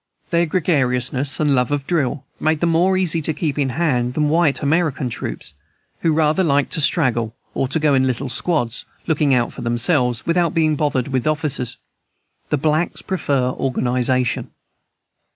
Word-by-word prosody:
Their 170 Hz, 0 st, +2 dB
gregariousness 140 Hz, -5 st, 0 dB
and 150 Hz, -2 st, +2 dB
love 125 Hz, 0 st, +1 dB
of 145 Hz, -1 st, -1 dB
drill 140 Hz, -4 st, -1 dB
made 155 Hz, 0 st, +1 dB
them 170 Hz, -1 st, +2 dB
more 180 Hz, +3 st, +3 dB
easy 170 Hz, -3 st, +1 dB
to 155 Hz, 0 st, -1 dB
keep 150 Hz, -2 st, -2 dB
in 135 Hz, -2 st, +1 dB
hand 125 Hz, -7 st, 0 dB
than 150 Hz, -1 st, +1 dB
white 155 Hz, -2 st, +2 dB
American 145 Hz, -4 st, 0 dB
troops, 80 Hz, -7 st, -6 dB, 0.5 s
who 165 Hz, -, +1 dB
rather 155 Hz, +3 st, +2 dB
like 145 Hz, -4 st, +1 dB
to 160 Hz, -, 0 dB
straggle 120 Hz, -7 st, +1 dB, 0.2 s
or 135 Hz, -, -1 dB
go 150 Hz, +1 st, +1 dB
in 130 Hz, -1 st, +3 dB
little 130 Hz, +2 st, -2 dB
squads, 125 Hz, -2 st, -1 dB, 0.2 s
looking 150 Hz, -4 st, +2 dB
out 120 Hz, -1 st, 0 dB
for -, -, -8 dB
themselves, 120 Hz, +1 st, +1 dB
without 170 Hz, 0 st, +1 dB
being 155 Hz, -2 st, +2 dB
bothered 145 Hz, -4 st, -1 dB
with 130 Hz, -1 st, -1 dB
officers. 150 Hz, -5 st, -1 dB, 0.7 s
The 150 Hz, -, +1 dB
blacks 155 Hz, +4 st, 0 dB
prefer 140 Hz, -9 st, 0 dB
organization. 125 Hz, -1 st, 0 dB
145 Hz, 160 wpm, -20 LUFS, 125-160 Hz, 0.7 s, more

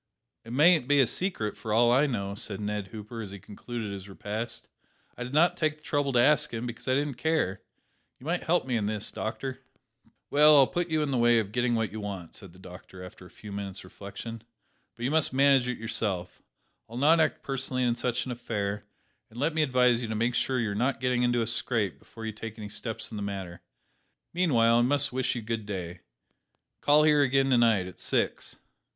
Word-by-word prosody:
"It 115 Hz, -, -10 dB
mayn't 155 Hz, +1 st, +4 dB
be 145 Hz, 0 st, +4 dB
a 135 Hz, -, +6 dB
secret, 115 Hz, -, -2 dB
for 110 Hz, -, -6 dB
all 120 Hz, +2 st, +4 dB
I 135 Hz, +4 st, +4 dB
know," 100 Hz, -6 st, -3 dB
said 100 Hz, 0 st, -3 dB
Ned 105 Hz, -1 st, -3 dB
Hooper, 110 Hz, +2 st, -8 dB
as 105 Hz, -, -6 dB
he 100 Hz, -, -8 dB
concluded 105 Hz, +3 st, -7 dB
his 100 Hz, 0 st, -8 dB
repast. 110 Hz, +4 st, -5 dB, 0.5 s
"I 125 Hz, -, -5 dB
did 125 Hz, -, -7 dB
not 160 Hz, +5 st, +4 dB
take 155 Hz, -1 st, 0 dB
the 155 Hz, -, -28 dB
trouble 145 Hz, -2 st, 0 dB
to 120 Hz, -, +4 dB
ask 150 Hz, +4 st, +4 dB
him; 115 Hz, +1 st, -4 dB
because 120 Hz, +1 st, -7 dB
I 130 Hz, -, +3 dB
didn't 140 Hz, -3 st, -2 dB
care. 125 Hz, -, 0 dB, 0.6 s
You 125 Hz, -, -14 dB
might 175 Hz, +3 st, -1 dB
help 175 Hz, -3 st, +1 dB
me 125 Hz, -2 st, 0 dB
in 105 Hz, -2 st, -1 dB
this, 105 Hz, -1 st, -3 dB
doctor." 130 Hz, +4 st, -4 dB, 0.7 s
"Well, 150 Hz, +1 st, +7 dB
I'll 135 Hz, -, +8 dB
put 175 Hz, +5 st, -2 dB
you 155 Hz, -1 st, +1 dB
in 145 Hz, -, -2 dB
the 130 Hz, -, +1 dB
way 120 Hz, 0 st, +5 dB
of 105 Hz, -3 st, -1 dB
getting 120 Hz, +1 st, +1 dB
what 115 Hz, -1 st, -1 dB
you 110 Hz, -, -6 dB
want," 100 Hz, -5 st, -6 dB
said 95 Hz, -5 st, -11 dB
the 90 Hz, -, -18 dB
doctor, 90 Hz, 0 st, -12 dB
after 90 Hz, 0 st, -12 dB
a -, -, -18 dB
few 105 Hz, -, -11 dB
moments 100 Hz, -1 st, -6 dB
reflection; 100 Hz, +4 st, -8 dB, 0.5 s
"but 115 Hz, -, -8 dB
you 130 Hz, -, 0 dB
must 155 Hz, -4 st, +2 dB
manage 135 Hz, -2 st, +4 dB
it 125 Hz, -, -2 dB
yourself. 105 Hz, -5 st, -3 dB, 0.5 s
I'll 115 Hz, -, -8 dB
not 155 Hz, +5 st, +5 dB
act 155 Hz, -1 st, +1 dB
personally 135 Hz, -1 st, -1 dB
in 120 Hz, -1 st, +2 dB
such 120 Hz, 0 st, -1 dB
an 130 Hz, -, -4 dB
affair; 105 Hz, -4 st, -3 dB, 0.5 s
and 110 Hz, -, -15 dB
let 150 Hz, +4 st, +1 dB
me 160 Hz, -, +1 dB
advise 125 Hz, -4 st, +3 dB
you 120 Hz, -, -3 dB
to 110 Hz, -, -3 dB
make 115 Hz, +3 st, +1 dB
sure 130 Hz, +1 st, 0 dB
that 120 Hz, -, +1 dB
you 105 Hz, -, -1 dB
are -, -, -2 dB
not 125 Hz, +5 st, 0 dB
getting 125 Hz, 0 st, +1 dB
into 120 Hz, -1 st, +2 dB
a -, -, -2 dB
scrape 115 Hz, -3 st, -1 dB
before 115 Hz, -1 st, -11 dB
you 110 Hz, -, -2 dB
take 110 Hz, +1 st, -8 dB
any 105 Hz, -2 st, -7 dB
steps 110 Hz, +1 st, -4 dB
in 110 Hz, -, -6 dB
the -, -, -4 dB
matter. 95 Hz, -4 st, -5 dB, 0.7 s
Meanwhile, 120 Hz, -10 st, +3 dB
I -, -, +4 dB
must 140 Hz, +2 st, +2 dB
wish 130 Hz, 0 st, 0 dB
you 120 Hz, -, -4 dB
good 110 Hz, -1 st, -4 dB
day. 90 Hz, -3 st, -5 dB, 0.8 s
Call 150 Hz, +1 st, +5 dB
here 150 Hz, -1 st, +5 dB
again 135 Hz, 0 st, +2 dB
to 125 Hz, -, +5 dB
night, 110 Hz, -6 st, +3 dB
at 90 Hz, -, -10 dB
six." -, -, -1 dB
120 Hz, 225 wpm, -28 LUFS, 105-135 Hz, 0.8 s, I'll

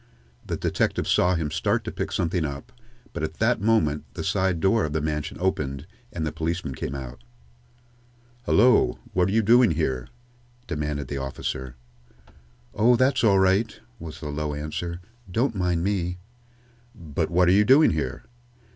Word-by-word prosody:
The -, -, -4 dB
detective -, -, -1 dB
saw 90 Hz, +1 st, +3 dB
him 80 Hz, -3 st, -2 dB
start 80 Hz, -, 0 dB
to -, -, -5 dB
pick -, -, -4 dB
something 85 Hz, 0 st, 0 dB
up, 70 Hz, -, -6 dB, 0.4 s
but -, -, -4 dB
at 80 Hz, +1 st, -3 dB
that 115 Hz, -1 st, +1 dB
moment 80 Hz, -10 st, +2 dB
the -, -, -4 dB
side 95 Hz, -2 st, 0 dB
door 100 Hz, +5 st, +2 dB
of 75 Hz, -, -2 dB
the 80 Hz, -, 0 dB
mansion 75 Hz, 0 st, -3 dB
opened 75 Hz, -6 st, -2 dB, 0.3 s
and 80 Hz, -3 st, -3 dB
the 80 Hz, -, -2 dB
policeman 80 Hz, -1 st, -3 dB
came 65 Hz, +1 st, -5 dB
out. 60 Hz, -3 st, -8 dB, 1.2 s
"Hullo! 125 Hz, -2 st, +4 dB, 0.2 s
What 90 Hz, 0 st, +2 dB
are -, -, -1 dB
you 110 Hz, +2 st, +2 dB
doing 120 Hz, +2 st, +6 dB
here?" 65 Hz, -6 st, -1 dB, 0.6 s
demanded 75 Hz, -4 st, -3 dB
the 70 Hz, -, -4 dB
officer. 65 Hz, -1 st, -5 dB, 1.0 s
"Oh, 120 Hz, +4 st, +4 dB
that's 130 Hz, +2 st, +2 dB
all 100 Hz, -4 st, +5 dB
right," 95 Hz, +4 st, +2 dB, 0.2 s
was 80 Hz, 0 st, -8 dB
the 75 Hz, -, -5 dB
low 75 Hz, 0 st, -3 dB
answer. 85 Hz, +4 st, -5 dB, 0.3 s
"Don't 115 Hz, +7 st, 0 dB
mind 90 Hz, -4 st, 0 dB
me." 90 Hz, -3 st, -1 dB, 0.8 s
"But 80 Hz, -1 st, -3 dB
what 90 Hz, +1 st, +3 dB
are -, -, +5 dB
you 100 Hz, +3 st, +5 dB
doing 135 Hz, +8 st, +6 dB
here?" 80 Hz, -3 st, -3 dB
85 Hz, 165 wpm, -25 LUFS, 75-100 Hz, 1.2 s, doing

